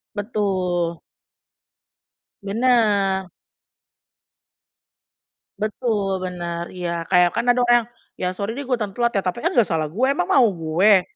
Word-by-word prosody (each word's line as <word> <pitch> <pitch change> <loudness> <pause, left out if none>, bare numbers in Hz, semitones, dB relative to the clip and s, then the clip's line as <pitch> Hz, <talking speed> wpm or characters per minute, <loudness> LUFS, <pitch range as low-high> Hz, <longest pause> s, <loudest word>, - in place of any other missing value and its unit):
Betul. 185 -5 -1 1.4
Benar. 205 -4 +1 2.3
Betul, 210 -3 -1
benar, 175 -2 -4
iya 170 -2 -4
kayak 180 -2 +4
kan 235 +1 0
ada 245 - +4
orang 240 -1 +4 0.3
"ya 180 - -2
sorry 200 +4 -4
deh 280 - -5
gua 255 -3 -1
dateng 210 -3 -4
telat 235 +2 +1
ya 195 - 0
tapi 180 +6 -2
kan 340 - +1
nggak 235 - +6
salah 155 -4 -1
gua 260 - +1
emang 175 - -2
mau 260 -3 +5
gua 180 +4 +3
195 Hz, 130 wpm, -22 LUFS, 180-235 Hz, 2.3 s, nggak